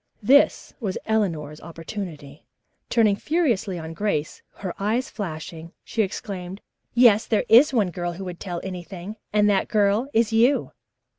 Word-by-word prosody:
This 275 +7 +4
was 200 -7 -3
Eleanor's 165 -9 -1
opportunity. 165 -3 -8 0.5
Turning 215 -4 +3
furiously 235 - 0
on 160 -1 -7
Grace, 165 -5 -2
her 185 -4 -5
eyes 220 +6 -1
flashing, 165 -3 -7
she 225 - -1
exclaimed: 195 -2 -5 0.4
"Yes, 235 -3 +5
there 220 +1 +1
is 250 +7 +7
one 210 -8 +1
girl 175 +1 -3
who 190 +3 -7
would 180 -2 -7
tell 175 -3 -4
anything, 185 +2 -7
and 210 0 +3
that 200 -2 +2
girl 210 +4 +2
is 225 -2 +2
you! 240 +5 +3
200 Hz, 145 wpm, -24 LUFS, 175-220 Hz, 0.5 s, is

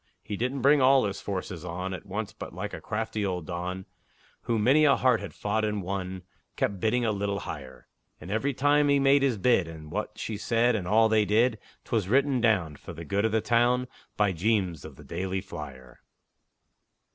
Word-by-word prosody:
He 105 - -4
didn't 125 +4 -2
bring 140 +1 +5
all 130 -1 +5
his 100 - -4
forces 95 -3 -5
on 90 +2 -4
At 95 +1 -8
once, 105 +2 -4
but - - -8
like 100 +3 -5
a - - -6
crafty 110 -1 -3
old 90 -4 -2
Don, 90 +2 -4 0.6
Who 115 - +1
many 130 +8 +4
a 140 -2 +6
heart 125 -3 +3
had 100 -5 -7
fought 105 +7 -2
and 105 -2 -1
won, 95 0 -4 0.3
Kept 100 -2 -1
bidding 115 +3 +1
a 110 - +2
little 100 -1 -2
higher; 65 -4 -8 0.3
And 95 - -9
every 115 +7 0
time 145 +2 +3
he 140 - +5
made 140 0 +4
his 135 -5 +2
bid, 100 -4 +3
And 80 -2 -10
what 105 +2 -4
she 110 -1 -4
said, 115 +2 +2
and 95 -5 -3
all 110 +3 +5
they 110 -1 +3
did 110 +3 +2 0.3
'Twas 110 -5 -1
written 135 +2 +2
down, 95 -10 +1
For 85 - -10
the 85 +1 -8
good 100 +6 0
of 110 - +1
the 110 0 +2
town, 120 +3 +2 0.3
By 105 -2 +3
Jeems, 90 -3 0
of - - -10
The - - -14
Daily 95 +3 -3
Flyer. 75 -9 -10
105 Hz, 205 wpm, -27 LUFS, 95-120 Hz, 0.6 s, a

